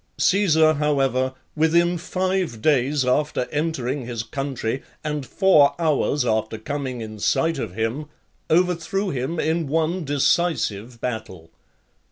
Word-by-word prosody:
Caesar, 160 -5 +4
however, 135 -3 0 0.2
within 170 +3 +3
five 185 - -2
days 140 +1 +2
after 125 0 0
entering 145 -4 -2
his 115 -2 -3
country, 135 -2 -3 0.2
and 150 -3 -3
four 185 -8 +4
hours 155 -3 +1
after 110 0 0
coming 130 +1 -4
in 110 -1 -7
sight 165 +10 +1
of 90 - -5
him, 115 +7 -2 0.4
overthrew 180 +3 +1
him 135 +5 -3
in 160 0 0
one 165 +4 0
decisive 135 - 0
battle. 95 -9 -5
145 Hz, 120 wpm, -23 LUFS, 125-165 Hz, 0.4 s, Caesar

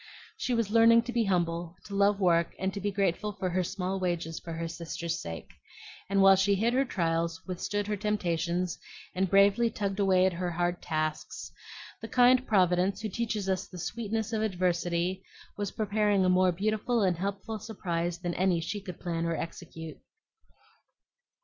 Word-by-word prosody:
She 250 - -1
was 230 -3 0
learning 230 +1 +6
to 245 +1 -5
be 230 -1 +2
humble, 170 -2 -1
to 200 - -9
love 200 0 +3
work, 170 -3 +2
and 190 0 -1
be 205 - 0
grateful 200 +1 0
for 185 -2 -3
her 185 +1 +1
small 190 +1 -3
wages 170 -3 -2
for 165 - -7
her 165 +1 -3
sister's 170 0 -4
sake; 85 0 -7 0.6
and 195 0 +3
while 195 0 +8
she 195 +1 +3
hid 225 +5 +1
her 270 +2 +3
trials, 165 -5 -1
withstood 205 +3 -2
her 210 0 -1
temptations, 180 -4 -1 0.3
and 190 0 0
bravely 200 +4 +5
tugged 200 -2 -3
away 190 -2 +4
at 190 - +2
her 180 +1 -2
hard 175 +1 -1
tasks, 155 -1 -3 0.5
the 225 - -6
kind 255 +2 +4
Providence, 185 0 +2
who 220 - -3
teaches 215 -1 -2
us 190 0 -1
the 180 - -11
sweetness 220 +4 -3
of 220 - 0
adversity, 180 -2 0 0.3
was 205 -1 -2
preparing 210 -2 +1
a - - +3
more 185 0 +4
beautiful 215 +5 0
and 180 -3 +2
helpful 200 +4 -4
surprise 175 -5 -3
than 175 0 -3
any 180 -1 +2
she 175 +5 -4
could 180 -3 -8
plan 170 -2 -2
or 165 - 0
execute. 160 -1 -7
190 Hz, 175 wpm, -29 LUFS, 175-210 Hz, 0.6 s, while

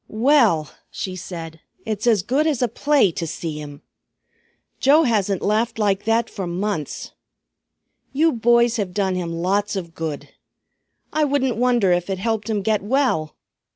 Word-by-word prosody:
"Well," 220 - +3 0.2
she 185 -1 -5
said, 165 -3 -8 0.3
"it's 215 +1 -3
as 215 -6 +3
good 275 +9 +1
as 280 -6 0
a - - +3
play 270 -2 +2
to 165 0 -4
see 155 -1 -5
him. 145 -1 -10 1.0
Joe 295 +4 +5
hasn't 205 - 0
laughed 220 +3 0
like 205 -2 0
that 225 +1 +2
for 190 -3 -5
months. 175 -3 -3 1.0
You 315 +4 +3
boys 235 0 +3
have 190 -4 -3
done 195 -2 +1
him 175 -2 -3
lots 195 +5 -1
of 170 -4 -5
good. 160 -3 -5 0.8
I 310 0 +2
wouldn't 270 -4 +1
wonder 240 -5 +2
if 175 +1 0
it 190 - -1
helped 220 +2 -2
him 210 -3 -1
get 215 0 +1
well! 205 - 0
210 Hz, 155 wpm, -21 LUFS, 180-240 Hz, 1.0 s, Joe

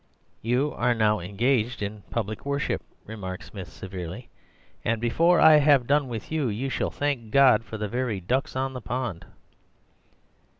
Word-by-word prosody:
"'You 125 +6 0
are 120 0 +1
now 105 -1 +2
engaged 115 +5 0
in 105 +1 -5
public 110 -2 -3
worship,' 140 0 -1 0.2
remarked 95 -4 -6
Smith 95 -4 -9
severely, 95 +7 -8 0.5
'and 115 0 0
before 165 +10 +3
I 155 -1 +8
have 140 -4 +5
done 145 +1 +2
with 115 0 -6
you, 155 -4 0
you 120 +6 -2
shall - - -1
thank 140 -6 -2
God 130 -2 +5
for 110 - -7
the 105 0 -2
very 120 -2 -2
ducks 125 +11 -1
on 130 0 -1
the 125 - -6
pond. 120 -8 -4
120 Hz, 160 wpm, -26 LUFS, 105-135 Hz, 0.5 s, I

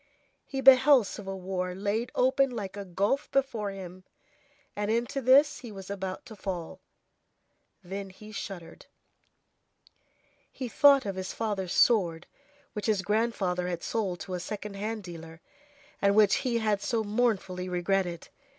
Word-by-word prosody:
He 270 -1 -3
beheld 265 -1 +7
civil 195 0 -6
war 180 -1 -3
laid 205 +5 -2
open 265 +2 +3
like 210 -6 -5
a 200 -1 -6
gulf 200 +10 0
before 245 -7 0
him, 185 -1 -9 0.7
and 205 0 -2
into 235 +4 0
this 270 +3 +5
he 240 -3 -9
was 195 -1 -8
about 190 -1 -5
to 220 - -10
fall. 185 -2 -5 1.0
Then 195 +2 -6
he 210 +3 -13
shuddered. 175 -5 -8 1.6
He 255 - -5
thought 275 +2 +5
of 195 -2 -3
his 185 0 -4
father's 200 -5 -2
sword, 175 -8 +3 0.5
which 210 -1 -4
his 205 -3 +1
grandfather 200 -4 0
had 175 -1 -4
sold 195 -6 -2
to 185 - -6
a 180 - -2
second 210 +2 -6
hand 215 +2 -4
dealer, 165 -2 -10 0.6
and 200 0 +3
which 210 -2 +5
he 245 -3 0
had 215 -3 0
so 230 -2 0
mournfully 205 -5 0
regretted. 180 -1 -1
200 Hz, 145 wpm, -28 LUFS, 185-230 Hz, 1.6 s, beheld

